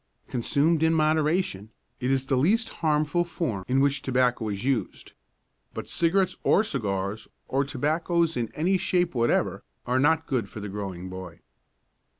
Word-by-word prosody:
Consumed 145 +6 +1
in 160 0 +3
moderation, 155 - +1 0.3
it 125 0 -1
is 135 -1 +1
the 135 - +1
least 215 - +2
harmful 155 +1 +2
form 155 - -3
in 130 +1 +2
which 140 +1 +2
tobacco 125 -4 +1
is 100 +1 -4
used. 130 -3 -2 0.6
But - - -6
cigarettes 185 +2 +2
or 205 - +4
cigars, 105 - -3 0.2
or 135 +1 +1
tobaccos 165 +4 0
in 115 -2 -2
any 185 +5 +1
shape 180 -1 +1
whatever, 120 -2 +1 0.2
are 125 +1 +1
not 160 +3 +3
good 120 -7 -1
for - - -8
the 105 0 -6
growing 95 -3 -5
boy. 95 -2 -9
140 Hz, 155 wpm, -26 LUFS, 115-165 Hz, 0.6 s, or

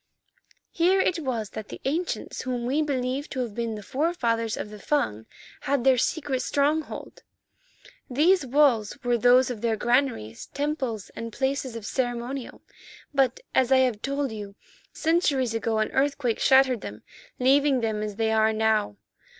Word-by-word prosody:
"Here 365 +3 +3
it 360 -2 +1
was 235 -8 -3
that 215 - -7
the - - -8
ancients 330 +6 -2
whom 245 -2 -3
we 275 +5 +1
believe 270 -1 -2
to 260 - -3
have 235 -4 -4
been 230 0 -3
the 210 - -8
forefathers 235 - -1
of 210 - -5
the 210 - -10
Fung, 110 - -1 0.4
had 280 -3 +2
their 260 -1 +4
secret 280 -3 -1
stronghold. 295 +2 -1 0.9
These 315 +7 +3
walls 260 -5 +2
were 245 -1 +2
those 250 +2 +5
of 225 -4 -6
their 230 -2 +1
granaries, 240 - 0
temples, 280 -8 -2
and 230 0 -6
places 265 0 -2
of 225 -3 -7
ceremonial, 245 +2 -3 0.5
but, 270 -3 +1
as 260 0 +2
I 265 - +7
have 225 -4 -2
told 275 -1 -2
you, 205 -2 -7 0.4
centuries 300 -7 +1
ago 225 0 -1
an 215 - 0
earthquake 270 -4 0
shattered 265 -4 +4
them, 105 +1 -8 0.3
leaving 270 +1 +3
them 220 -2 -1
as 210 -1 -4
they 220 +1 0
are 220 0 +3
now. 220 - +1
250 Hz, 160 wpm, -26 LUFS, 220-280 Hz, 0.9 s, I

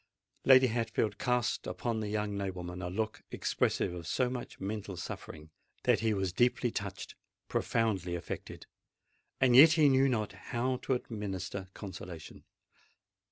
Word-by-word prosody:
Lady 130 -1 +8
Hatfield 115 -3 -1
cast 125 -2 0
upon 110 +6 -2
the 105 -1 -3
young 105 -1 -1
nobleman 90 -2 -4
a 90 - -3
look 110 +4 -3
expressive - - 0
of 85 -2 -7
so 125 +6 +1
much 125 -2 -6
mental 100 -1 -4
suffering, 75 -2 -7 0.3
that - - +4
he 110 0 +1
was 95 -3 -1
deeply 120 +2 +2
touched—profoundly 100 -1 -3
affected: 85 - -6 0.7
and 125 -2 +5
yet 155 +5 +10
he 155 -3 +5
knew 135 0 +4
not 110 -5 -1
how 120 +6 -2
to 130 - 0
administer 100 -5 -5
consolation. 90 -5 -8
105 Hz, 135 wpm, -32 LUFS, 95-125 Hz, 0.7 s, yet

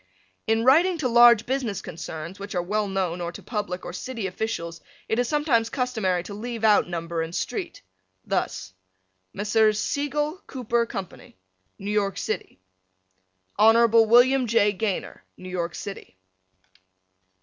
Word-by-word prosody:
In 225 +1 +2
writing 335 +7 +5
to 295 -5 0
large 235 -2 +6
business 250 -6 -2
concerns 165 +1 -7
which 200 0 -7
are 175 - +1
well 210 +3 -1
known 185 -3 -2
or 170 0 -3
to - - -10
public 205 -5 -4
or 175 - -6
city 230 +2 -5
officials 180 -4 -4 0.3
it 220 - 0
is 245 - +1
sometimes 285 -7 +1
customary 220 -9 -1
to 200 - -8
leave 230 +2 -6
out 210 -4 +4
number 170 -1 -3
and 165 +2 -5
street. - - -4 0.4
Thus, 95 - -2 0.6
Messrs. 215 +1 +2
Seigel, 295 - -2
Cooper 235 -2 -1
Co., 195 - -4 0.7
New 200 +1 -5
York 200 -2 0
City, 210 - -4 1.0
Hon. 225 +2 +6
William 245 +3 +5
J. 210 -2 +3
Gaynor, 200 -1 -3
New 185 - -9
York 170 -1 -3
City. 145 - -8
215 Hz, 140 wpm, -25 LUFS, 185-240 Hz, 1.0 s, large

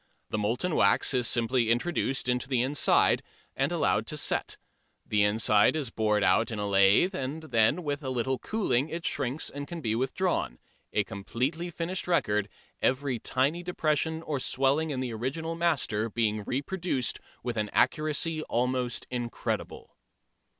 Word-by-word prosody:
The 110 - -1
molten 120 +12 0
wax 100 +7 +3
is 125 -2 +2
simply 120 0 +2
introduced 135 +1 0
into 125 +1 0
the 125 -3 +1
inside, 140 +3 +3 0.3
and - - 0
allowed - - +1
to - - -3
set; - - -1 0.5
the 105 -1 +1
inside 105 +3 +4
is 140 -7 -2
bored 105 -2 +1
out 95 +5 +3
in 110 - -4
a 105 0 -2
lathe, 100 - +4
and 140 +2 -4
then 125 +4 +2
with 145 -1 -2
a 135 - -4
little 130 +1 -1
cooling 160 - 0
it 165 +1 -5
shrinks 140 +1 -1
and 145 0 -6
can 170 +2 -6
be 110 -8 -1
withdrawn, 130 - -1 0.3
a 105 - +1
completely 125 - -3
finished 175 +2 -3
record, 105 - +1 0.3
every 130 -2 0
tiny 140 +9 0
depression 160 -2 -1
or 145 -4 -2
swelling 135 +5 +1
in 130 -3 -2
the 125 -3 -3
original 135 +9 -3
master 145 -10 0
being 110 -2 -1
reproduced 140 -1 -1 0.2
with 120 -1 -3
an 105 -1 -1
accuracy 155 +1 +1
almost 125 0 -1
incredible. 120 -1 -4
130 Hz, 155 wpm, -28 LUFS, 115-155 Hz, 0.5 s, inside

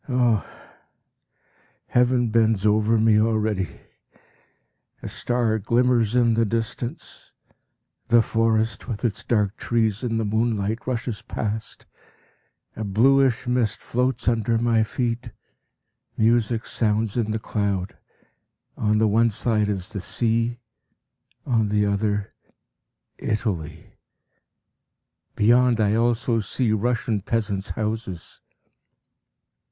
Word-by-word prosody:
Ah! 120 -5 +2 1.4
the - - -29
heaven 125 -1 +3
bends 110 -3 +2
over 110 +2 +3
me 110 -1 +4
already; 110 -5 -1 1.2
a - - -4
star 120 -3 0
glimmers 120 +1 +2
in 120 -2 +4
the 115 +1 +2
distance; 115 +2 -4 0.7
the 120 -1 +5
forest 115 0 0
with 115 -1 -4
its 110 - -2
dark 105 -3 0
trees 115 -1 0
in 115 -2 -1
the 115 - -1
moonlight 110 0 -1
rushes 120 -3 -3
past; 110 0 -5 0.9
a 110 - -4
bluish 125 +5 +3
mist 125 -3 0
floats 125 0 -2
under 115 -1 +1
my 115 -1 +2
feet; 120 +2 -2 0.9
music 115 0 +2
sounds 110 -1 0
in 115 -3 0
the 110 - -1
cloud; 100 -4 -2 0.8
on 105 -1 +1
the 110 0 +3
one 115 +3 +3
side 110 -1 0
is 95 -1 -3
the 100 - -4
sea, 115 +3 0 0.9
on 115 -4 +1
the 105 0 +1
other, 100 0 -1 0.9
Italy; 85 -8 -3 1.4
beyond 120 +2 +4
I 105 -1 +2
also 115 +1 +1
see 110 +2 -1
Russian 110 -1 0
peasants' 105 -2 -2
houses. 110 -5 -4
110 Hz, 110 wpm, -23 LUFS, 105-120 Hz, 1.4 s, the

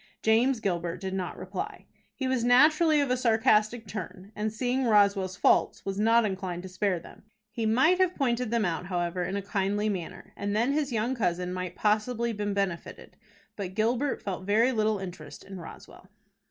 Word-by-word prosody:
James 235 +3 +3
Gilbert 175 -4 -2
did 190 0 -4
not 185 -2 -4
reply. 185 +1 -6 0.3
He 265 - -2
was 260 -2 0
naturally 305 +5 +5
of 280 -3 +1
a - - +3
sarcastic 220 -1 +2
turn, 200 -1 -7
and, 215 +1 -2
seeing 250 +4 -1
Roswell's 200 -4 +3
faults, - - +2
was 195 0 -3
not 225 +1 +4
inclined 185 -3 -4
to 190 - -8
spare 185 -1 0
them. 165 - -14 0.3
He 225 -1 -2
might 265 +12 +4
have 370 -1 +2
pointed 245 -3 0
them 230 -2 +1
out, 175 +1 -2
however, 175 -1 -2
in 190 - -3
a 200 - -3
kindly 205 +1 -1
manner, 185 -5 -6
and 205 0 -3
then 235 +5 +2
his 290 -2 -1
young 230 +2 0
cousin 180 -6 -1
might 180 -1 -4
possibly 225 +2 0
been 205 -1 -3
benefited; 195 -4 -4 0.4
but 190 -2 -6
Gilbert 240 +6 0
felt 185 -2 -4
very 220 +6 +3
little 215 -3 +1
interest 180 -5 -8
in 195 -1 -9
Roswell. 165 - -12
210 Hz, 180 wpm, -28 LUFS, 185-235 Hz, 0.4 s, naturally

